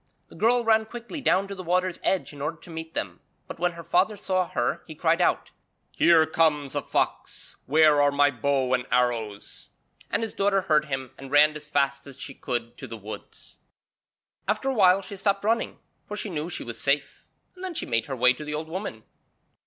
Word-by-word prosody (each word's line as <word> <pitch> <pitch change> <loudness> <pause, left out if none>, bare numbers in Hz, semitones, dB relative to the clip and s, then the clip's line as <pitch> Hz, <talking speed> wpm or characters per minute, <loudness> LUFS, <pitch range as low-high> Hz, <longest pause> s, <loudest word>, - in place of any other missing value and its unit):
The - - -14
girl 235 +6 +3
ran 220 -1 +4
quickly 240 +6 -7
down 195 -6 +2
to 200 - -6
the 190 - -7
water's 180 +1 0
edge 190 -5 0
in 145 - -10
order 150 +3 -2
to 170 - -16
meet 160 0 -7
them, 85 -3 -3 0.3
but - - -8
when 175 0 +1
her 170 0 -9
father 190 +6 +2
saw 185 -2 0
her - - -1
he - - -8
cried - - +2
out: - - +1 0.4
'Here 165 -2 +5
comes 155 -3 +1
a - - -1
fox; - - -2
where 150 +1 +5
are 145 0 +4
my 145 0 +4
bow 130 0 0
and 125 0 0
arrows?' 115 -5 -1 0.4
And - - 0
his 225 - -3
daughter 195 0 +2
heard 155 -5 +2
him 135 -3 -4
and 135 0 -9
ran 150 +2 +5
as 150 0 -8
fast 140 -1 0
as 140 -1 -12
she 135 - -6
could 120 -2 -4
to - - -8
the 115 - -7
woods. 105 +1 -10 0.9
After 215 +6 0
a - - +1
while 195 -4 +5
she 195 +1 -8
stopped 200 0 0
running, 225 +2 0 0.3
for 210 - -7
she 210 -1 -3
knew 155 0 -3
she - - -4
was 120 -1 -6
safe, 140 0 -1 0.3
and 365 - -12
then 370 -2 -4
she - - -2
made 115 -2 0
her 135 - -3
way 125 0 +4
to 140 - -8
the 150 0 -4
old 155 +1 -5
woman. 170 - -5
155 Hz, 215 wpm, -26 LUFS, 140-195 Hz, 0.9 s, Here